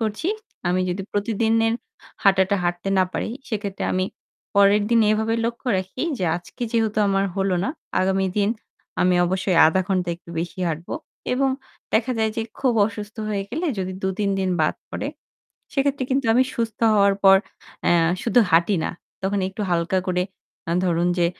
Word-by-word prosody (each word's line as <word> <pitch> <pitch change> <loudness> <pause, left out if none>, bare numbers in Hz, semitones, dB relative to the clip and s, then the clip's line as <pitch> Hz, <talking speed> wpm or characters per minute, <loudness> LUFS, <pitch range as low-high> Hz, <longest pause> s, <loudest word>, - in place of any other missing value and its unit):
করছি। 220 - -1 0.4
আমি 180 +1 +2
যদি 180 +2 -2
প্রতিদিনের 225 +2 +1 0.5
হাঁটাটা 195 0 +4
হাঁটতে 175 +2 -1
না 185 - +5
পারি। - - -2 0.2
সেক্ষেত্রে 205 -3 -3
আমি 185 0 +1 0.5
পরের 200 +1 +5
দিন 230 - +5
এভাবে 220 +1 +1
লক্ষ্য 235 +3 -4
রাখি 190 +7 -5 0.2
যে, 185 - -1
"আজকে 175 +8 -9
যেহেতু 220 -2 +1
আমার 195 0 +2
হলো 195 -1 +1
না। - - 0 0.3
আগামী 190 +1 +1
দিন 205 -1 +3 0.5
আমি 180 0 +4
অবশ্যই 190 0 0
০.৫ 160 +4 +2
ঘণ্টা 185 -2 0
একটু 170 - -15
বেশি 175 +3 -4
হাঁটব।" 165 +2 -4 0.4
এবং 270 +2 +2 0.4
দেখা 235 +3 +2
যায় 220 0 +2
যে 225 - 0 0.2
খুব 260 -3 +2
অসুস্থ 210 0 -7
হয়ে 205 -2 -1
গেলে 320 +9 -2
যদি 185 0 -2
২, 190 0 0
৩ 200 -1 +1
দিন 190 -1 0
বাদ - - +2 0.2
পড়ে। - - -3 0.6
সেক্ষেত্রে 275 -1 +1
কিন্তু 265 -1 +1
আমি 250 +3 +5
সুস্থ 225 -2 -2 0.2
হওয়ার 200 -1 +4
পর 195 0 +9 0.5
অ্যা - - +4 0.3
শুধু 240 +1 +4
হাঁটি 170 +5 +4
না। - - -1 0.3
তখন 195 +1 0
একটু 190 +3 -8
হালকা 175 +2 +1
করে 180 0 +1 0.5
আ - - +1
ধরুন, 175 0 +2
যে 170 - +4
200 Hz, 170 wpm, -23 LUFS, 185-225 Hz, 0.6 s, পর